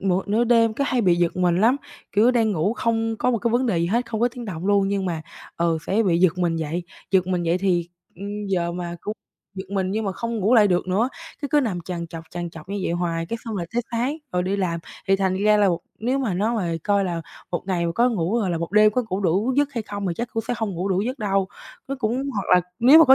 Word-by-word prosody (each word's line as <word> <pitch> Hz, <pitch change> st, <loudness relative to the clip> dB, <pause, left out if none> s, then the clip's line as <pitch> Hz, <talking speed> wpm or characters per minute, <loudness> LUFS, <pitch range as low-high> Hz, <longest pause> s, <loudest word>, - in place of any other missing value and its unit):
một 190 Hz, 0 st, 0 dB
nửa 225 Hz, +3 st, +3 dB
đêm 230 Hz, -2 st, +4 dB
cứ 280 Hz, -, 0 dB
hay 255 Hz, -3 st, +1 dB
bị 180 Hz, -5 st, +4 dB
giật 175 Hz, 0 st, +1 dB
mình 180 Hz, -1 st, +2 dB
lắm. 235 Hz, +5 st, +4 dB, 0.4 s
Kiểu 220 Hz, +5 st, +5 dB
đang 230 Hz, -3 st, +2 dB
ngủ 185 Hz, +4 st, +1 dB
không 225 Hz, -2 st, 0 dB
có 250 Hz, -, +1 dB
một 235 Hz, -, +1 dB
cái 235 Hz, +2 st, 0 dB
vấn 245 Hz, +3 st, +2 dB
đề 190 Hz, -8 st, +1 dB
gì 170 Hz, -, +1 dB
hết, 235 Hz, +7 st, 0 dB
không 220 Hz, -2 st, -3 dB
có 240 Hz, -, +4 dB
tiếng 245 Hz, 0 st, -8 dB
động 185 Hz, -4 st, -5 dB
luôn 200 Hz, -1 st, +3 dB
nhưng 200 Hz, -1 st, -1 dB
mà, 165 Hz, -3 st, -2 dB, 0.3 s
ờ, 170 Hz, -1 st, +1 dB
sẽ 210 Hz, +4 st, +2 dB
bị 175 Hz, -5 st, +2 dB
giật 185 Hz, 0 st, +3 dB
mình 170 Hz, -2 st, +1 dB
dậy, 160 Hz, +2 st, -2 dB, 0.3 s
giật 185 Hz, -2 st, +3 dB
mình 180 Hz, -1 st, 0 dB
dậy 170 Hz, +1 st, +1 dB
thì, 180 Hz, -3 st, +1 dB, 0.3 s
ừm, 205 Hz, +2 st, -5 dB
giờ 175 Hz, -3 st, 0 dB
mà 175 Hz, -1 st, -5 dB
cũng 210 Hz, -, -4 dB, 0.4 s
giật 190 Hz, 0 st, -7 dB
mình 190 Hz, -2 st, 0 dB
nhưng 215 Hz, +2 st, -1 dB
mà 195 Hz, -, -1 dB
không 230 Hz, +4 st, -3 dB
ngủ 210 Hz, +5 st, +3 dB
lại 215 Hz, -3 st, +6 dB
được 180 Hz, 0 st, +1 dB
nữa, 210 Hz, +7 st, +2 dB, 0.3 s
thế 285 Hz, -, -2 dB
cứ 295 Hz, -, +4 dB
nằm 210 Hz, -10 st, -1 dB
trằn 170 Hz, 0 st, -5 dB
trọc, 165 Hz, -1 st, -8 dB
trằn 175 Hz, -1 st, -4 dB
trọc 165 Hz, 0 st, -12 dB
như 200 Hz, +1 st, -3 dB
vậy -, -, -1 dB
hoài, 170 Hz, -1 st, -1 dB
cái 230 Hz, -, -3 dB
xong 225 Hz, -3 st, -4 dB
rồi 170 Hz, -, -3 dB
tới 240 Hz, -, +1 dB
sáng 245 Hz, +5 st, -1 dB, 0.2 s
rồi 180 Hz, -, +1 dB
đi 190 Hz, +2 st, -1 dB
làm. 170 Hz, -4 st, -1 dB, 0.3 s
Thì 195 Hz, -, +5 dB
thành 190 Hz, -1 st, +1 dB
ra 210 Hz, +2 st, +4 dB
là 205 Hz, -, +4 dB, 0.3 s
nếu 250 Hz, +5 st, 0 dB
mà 230 Hz, -9 st, -1 dB
nó 215 Hz, +6 st, +1 dB
mà 175 Hz, -5 st, -1 dB
coi 200 Hz, -1 st, +2 dB
là 170 Hz, -2 st, -2 dB, 0.3 s
một 175 Hz, -, -2 dB
ngày 175 Hz, -3 st, 0 dB
mà 170 Hz, -, -1 dB
có 240 Hz, +7 st, +3 dB
ngủ 210 Hz, -1 st, 0 dB
hoặc 200 Hz, -, 0 dB
là 170 Hz, -2 st, -1 dB
một 170 Hz, +2 st, -4 dB
đêm 215 Hz, 0 st, +6 dB
có 250 Hz, -, +1 dB
ngủ 190 Hz, -1 st, -2 dB
đủ 200 Hz, +7 st, +1 dB
giấc 290 Hz, 0 st, +2 dB
hay 235 Hz, -4 st, -2 dB
không 200 Hz, -2 st, -5 dB
thì 175 Hz, -, 0 dB
chắc 235 Hz, -, -3 dB
cũng 225 Hz, -, -1 dB
sẽ 245 Hz, -, +1 dB
hông 220 Hz, -2 st, -2 dB
ngủ 180 Hz, +3 st, -2 dB
đủ 190 Hz, -1 st, +1 dB
giấc 255 Hz, +6 st, -3 dB
đâu. 195 Hz, -3 st, 0 dB, 0.4 s
Nó 275 Hz, -, -1 dB
cũng 255 Hz, +4 st, -1 dB
hoặc 200 Hz, -, -1 dB
là 180 Hz, -, +6 dB, 0.2 s
nếu 265 Hz, +7 st, +8 dB
mà 325 Hz, -, +9 dB
có 265 Hz, -2 st, +8 dB
200 Hz, 285 wpm, -23 LUFS, 175-230 Hz, 0.4 s, mà